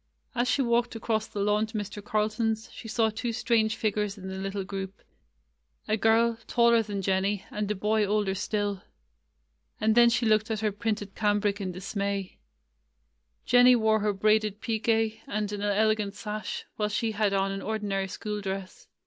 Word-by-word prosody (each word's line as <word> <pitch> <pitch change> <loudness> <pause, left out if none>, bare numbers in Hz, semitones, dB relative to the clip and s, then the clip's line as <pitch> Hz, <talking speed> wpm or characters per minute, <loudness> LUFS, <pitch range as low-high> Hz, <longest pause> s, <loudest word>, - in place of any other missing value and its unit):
As 245 0 0
she 260 +4 +2
walked 235 0 +1
across 220 -1 -1
the 205 - -4
lawn 210 +2 +2
to 220 0 -5
Mr. 205 0 -5
Carlton's, 220 +1 -1
she 225 - -10
saw 220 0 +1
two 230 +2 -3
strange 220 -2 +1
figures 210 -1 -1
in 190 -1 -7
the 190 0 -5
little 195 0 -3
group 195 0 -6 0.4
— - - -41
a 215 - +2
girl, 225 +1 +3
taller 235 -1 +4
than 205 -3 -4
Jennie, 195 +1 0
and 210 -1 -3
a 210 - 0
boy 210 +2 +1
older 205 -1 +1
still. 205 0 -2 1.0
And 220 0 +3
then 235 +1 +7
she 235 +1 +1
looked 215 +1 +3
at 220 -1 -2
her 215 -1 +1
printed 205 -1 -3
cambric 205 -1 +1
in 185 -2 -2
dismay. 200 +1 -3 1.1
Jen 245 0 +6
nie 250 0 +8
wore 220 -1 +3
her 210 0 +1
braided 215 +1 +2
pique 225 0 -2 0.4
and 210 0 -2
an 205 -1 -4
elegant 210 0 +1
sash, 210 -1 -5
while 210 -1 0
she 220 +2 -1
had 210 -1 +1
on 195 0 +1
an 195 0 -4
ordinary 200 -2 -2
school 210 +2 -5
dress. 195 -1 -6
210 Hz, 180 wpm, -28 LUFS, 200-220 Hz, 1.1 s, nie